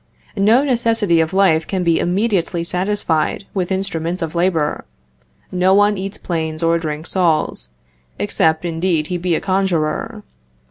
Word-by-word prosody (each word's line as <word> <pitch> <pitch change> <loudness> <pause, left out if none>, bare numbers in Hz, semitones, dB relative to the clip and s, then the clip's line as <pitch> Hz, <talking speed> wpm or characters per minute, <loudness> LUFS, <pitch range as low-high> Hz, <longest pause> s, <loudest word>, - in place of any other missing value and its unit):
No 215 +6 +4
necessity 230 - +2
of 160 0 +1
life 185 -5 +3
can 190 -2 -1
be 170 -1 +2
immediately 185 -2 0
satisfied 180 -1 -1
with 185 -2 -2
instruments 180 -2 -2
of 160 - -4
labor; 170 -4 0 0.7
no 185 +1 +3
one 205 +1 +4
eats 195 +1 -5
planes 160 -2 -3
or 165 0 +3
drinks 155 0 -5
saws, 165 - 0 0.5
except, 160 +1 +1
indeed, 165 -1 0
he 175 - -1
be 175 -1 0
a - - 0
conjurer. 190 +2 -1
180 Hz, 140 wpm, -18 LUFS, 165-195 Hz, 0.7 s, No